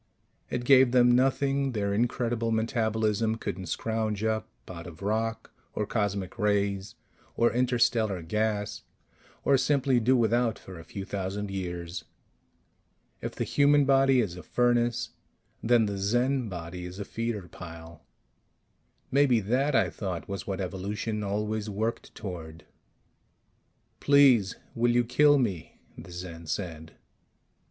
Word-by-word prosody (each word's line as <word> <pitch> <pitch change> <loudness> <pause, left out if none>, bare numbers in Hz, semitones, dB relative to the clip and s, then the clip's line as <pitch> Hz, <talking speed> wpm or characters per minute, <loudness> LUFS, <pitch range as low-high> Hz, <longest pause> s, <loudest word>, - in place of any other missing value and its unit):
It 120 0 -3
gave 130 -1 +6
them 125 -1 +6
nothing 135 +1 +2
their 100 -2 -1
incredible 115 +1 0
metabolism 110 -1 0
couldn't 95 -4 -5
scrounge 110 +2 -2
up 110 0 -1 0.2
out 85 -1 -8
of 85 +2 -11
rock 115 +2 -2 0.2
or 105 - -1
cosmic 100 -2 -2
rays 100 -2 0 0.4
or 120 - +3
interstellar 115 -6 +1
gas 105 +3 -1 0.6
or 140 -2 +4
simply 135 -1 +2
do 125 +3 +3
without 115 0 +2
for 95 -3 -11
a - - -10
few 95 +4 -7
thousand 100 +1 -4
years. 90 -2 -5 1.2
If - - -5
the - - -1
human 145 0 +4
body 135 -1 +4
is 95 -6 -3
a 90 - -8
furnace, 120 +5 +1 0.5
then 115 -1 +4
the 100 -1 -3
Zen 120 +4 +1
body 90 0 -6
is 90 +1 -8
a 100 - -5
feeder 115 -5 -4
pile. 85 -2 -11 1.1
Maybe 135 -4 +4
that, 130 +8 +1
I - - +3
thought, 95 -5 -5
was 100 -3 -5
what 95 -1 -3
evolution 100 +3 -3
always 105 +1 -2
worked 110 +3 -3
toward. 85 -5 -8 1.3
"Please, 135 -8 +5 0.2
will 120 +1 +2
you 120 0 +4
kill 145 +5 +4
me?" 100 - -2 0.2
the - - -11
Zen 85 -2 -8
said. 80 -2 -5
110 Hz, 130 wpm, -28 LUFS, 95-120 Hz, 1.3 s, gave